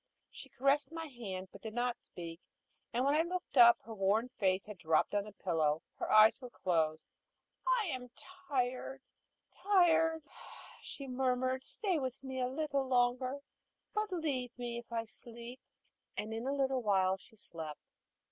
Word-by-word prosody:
She 270 - -10
caressed 275 +4 +2
my 325 0 -5
hand, 200 -9 -6
but 200 - -12
did 220 +1 -7
not 245 0 -1
speak; 170 -1 -8 0.5
and 245 +3 +1
when 280 - +4
I 310 - +4
looked 360 0 -4
up, 235 -2 +9
her 225 - -8
worn 210 +4 +2
face 190 -6 +1
had 210 -3 -9
dropped 160 +3 +2
on 205 -1 +1
the 210 - -9
pillow, 160 -6 0
and - - -39
her - - -2
eyes 215 +4 +7
were 250 - -7
closed. 160 -7 0 0.6
"I - - +3
am 250 -3 -4
tired 265 -1 -3 0.5
tired," 325 -5 +4 0.6
she 275 - -7
murmured. 255 0 0
"Stay 370 +2 -1
with 260 -1 -4
me 260 -1 -4
a 250 - +2
little 275 0 -1
longer, 255 +2 +1 0.5
but 425 -1 -1
leave 270 -9 -2
me 240 -1 -3
if 235 - -14
I 230 -1 -1
sleep." 235 +2 -9 0.6
And 220 +1 -3
in 225 +3 -3
a - - +1
little 265 -2 +1
while 190 -3 +3
she 220 +4 -18
slept. 160 -7 -8
250 Hz, 165 wpm, -34 LUFS, 210-275 Hz, 0.6 s, up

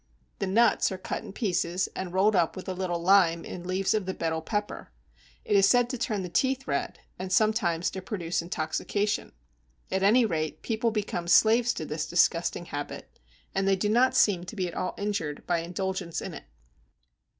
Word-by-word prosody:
The - - -1
nuts 225 +3 +3
are 190 - -4
cut 185 - -5
in - - -9
pieces 185 -4 -1
and 190 -2 -4
rolled 195 +3 +3
up 170 -3 +2
with 185 - -8
a 190 - -2
little 180 -2 -2
lime 170 -2 +4
in 180 -1 -7
leaves 185 +1 +1
of 210 -4 -1
the 190 - -2
Betel 160 -1 -2
pepper. 205 - -4 0.5
It - - +1
is 195 -1 +6
said 245 0 +3
to 255 - -3
turn 215 -4 -1
the - - -4
teeth 265 +9 0
red - - -2 0.2
and 185 0 -5
sometimes 190 -5 +2
to 190 - -6
produce 180 -4 -2
intoxication; 185 +5 -2 0.6
at 190 - 0
any 225 +5 +5
rate, 155 -6 -3
people 230 0 0
become 205 -5 -3
slaves 225 +6 +5
to 160 - -5
this 150 +1 -3
disgusting 175 0 +1
habit, 145 -3 -7 0.3
and 195 0 0
they 195 - +4
do 205 +2 -1
not 245 +4 +3
seem 185 -4 +3
to 205 - -8
be 185 -3 -1
at 170 - -7
all 185 - -3
injured 200 -8 -3
by 175 -1 +1
indulgence 180 0 -3
in - - -6
it. - - -9
190 Hz, 195 wpm, -27 LUFS, 175-210 Hz, 0.6 s, is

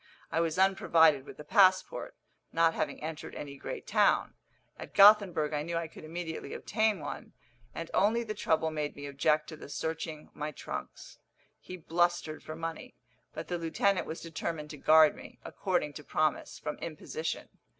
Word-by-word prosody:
I 165 - +1
was 165 -1 0
unprovided 165 -7 +4
with - - -11
a - - -7
passport, 185 +4 +3 0.4
not 165 0 +3
having 150 -1 -3
entered 155 -1 -6
any 140 -1 -7
great - - -7
town. - - +3 0.5
At - - -9
Gothenburg 195 -7 +6
I 150 - 0
knew 170 +2 -3
I 165 -1 -2
could 155 - -13
immediately 160 +1 -5
obtain 215 -2 0
one, 145 - -7 0.4
and - - -6
only 225 +4 +3
the 215 -2 -4
trouble 160 -4 +1
made 150 -1 -3
me 145 - -8
object 150 +2 +1
to 160 - -7
the 150 - -11
searching 160 0 -4
my 150 +1 -4
trunks. - - -8 0.4
He 185 - -9
blustered 175 -1 0
for 155 - -7
money; 165 0 -6 0.4
but 155 - -5
the 175 -1 -2
lieutenant 180 +4 +1
was 160 - -6
determined 160 -2 -5
to 150 - -8
guard 155 +1 +6
me, - - -12
according 175 -7 -1
to 150 - -9
promise, 155 +1 -1
from 150 - -5
imposition. 160 0 -5
160 Hz, 170 wpm, -30 LUFS, 150-175 Hz, 0.5 s, Gothenburg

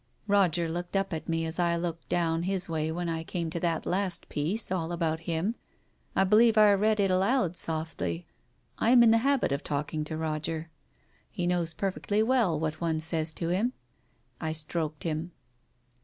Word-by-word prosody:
Roger 185 -5 +2
looked 175 +3 -4
up 195 -1 0
at 160 0 -5
me, 165 0 0
as 160 +2 -2
I 170 -1 +2
looked 170 -1 -4
down 165 -1 +1
his 190 +1 -2
way 160 -1 -1
when 175 +1 -3
I 165 -1 -2
came 165 -1 -3
to 170 - -3
that 165 -1 -1
last 185 -1 -1
piece 180 +9 -1
all 170 -3 -1
about 165 -2 -1
him. 170 +7 0 0.6
I 190 - +4
believe 220 +3 +5
I 210 -1 +7
read 215 +2 +2
it 195 -2 +3
aloud 190 -1 +2
softly. 155 - -2 0.5
I 225 - +2
am 240 -1 +7
in 225 - +6
the 225 - +5
habit 275 - +1
of 140 +1 -1
talking 150 +2 -2
to 155 0 -4
Roger. 160 +1 -3 0.6
He 180 -5 -3
knows 175 -2 0
perfectly 205 +2 0
well 225 - +2
what 155 0 -3
one 165 -2 0
says 160 0 0
to 165 - -2
him. 210 +8 +1 0.7
I 160 -1 -2
stroked 155 -1 -3
him. 165 +1 -3
170 Hz, 185 wpm, -28 LUFS, 160-195 Hz, 0.7 s, I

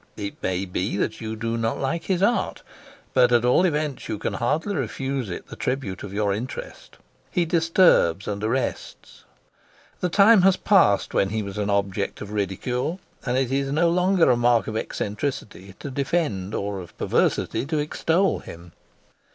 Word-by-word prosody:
It 100 -1 -6
may 95 +1 -1
be 95 +2 -2
that 110 - -2
you 110 0 -4
do 115 +1 -2
not 115 0 -1
like 165 +5 -2
his 190 -1 0
art, 235 +4 +1 0.5
but 125 -1 +4
at 120 0 +4
all 125 +9 +4
events 150 -5 -2
you 110 - -2
can - - -3
hardly 160 - -1
refuse 135 - -3
it 85 - -6
the - - -9
tribute 125 -7 -3
of 100 - -7
your 100 0 0
interest. 120 +5 -7 0.3
He 175 +5 +1
disturbs 165 - +3
and 105 0 -3
arrests. 125 +4 -3 0.7
The 180 - 0
time 200 +4 +6
has 190 0 +4
passed 185 - +3
when 95 - +2
he 110 +1 -2
was 100 0 -6
an 105 0 -1
object 100 0 -1
of 105 - -7
ridicule, 125 - -2 0.3
and 125 +1 +1
it 130 -1 0
is 135 0 0
no 165 +3 +3
longer 180 -4 +3
a - - +4
mark 120 -1 +3
of 110 - -5
eccentricity 105 -4 -4
to 140 - -7
defend 130 - -1
or 100 -1 -3
of 90 -2 -11
perversity 135 - 0
to 155 +1 -1
extol 165 +5 +1
him. 85 +1 -11
120 Hz, 175 wpm, -24 LUFS, 100-160 Hz, 0.7 s, time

